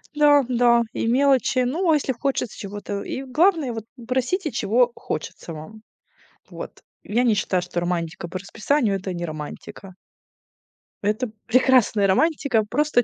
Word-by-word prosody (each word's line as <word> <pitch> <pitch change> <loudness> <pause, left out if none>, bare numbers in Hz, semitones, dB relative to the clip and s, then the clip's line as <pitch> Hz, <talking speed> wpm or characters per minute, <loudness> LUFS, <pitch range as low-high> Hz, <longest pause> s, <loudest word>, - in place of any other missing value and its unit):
Да 290 -2 +5
да. 235 -1 +4
И - - -2
мелочи. 260 0 +3
Ну, 330 +7 0
а - - +5
если 275 -2 0
хочется 255 -2 -2
чего-то. 205 0 -5
И 270 - -5
главное, 300 -1 +2
вот 225 -1 -6 0.2
просите, 265 +6 -1
чего 240 +4 +2
хочется 160 +2 -6
вам. 185 +8 -10 0.7
Вот, - - -9 0.2
я 235 +4 0
не 225 -3 +4
считаю, 185 -3 0
что 175 -1 -3
романтика 170 -1 -3
по 185 - -5
расписанию- 215 +3 0
это 190 -1 -5
не 175 0 -4
романтика. 155 +4 -8 1.1
Это 215 +4 -1 0.2
прекрасная 245 -4 +4
романтика, 275 - +2
просто 295 -3 +2
235 Hz, 145 wpm, -23 LUFS, 195-270 Hz, 1.1 s, Да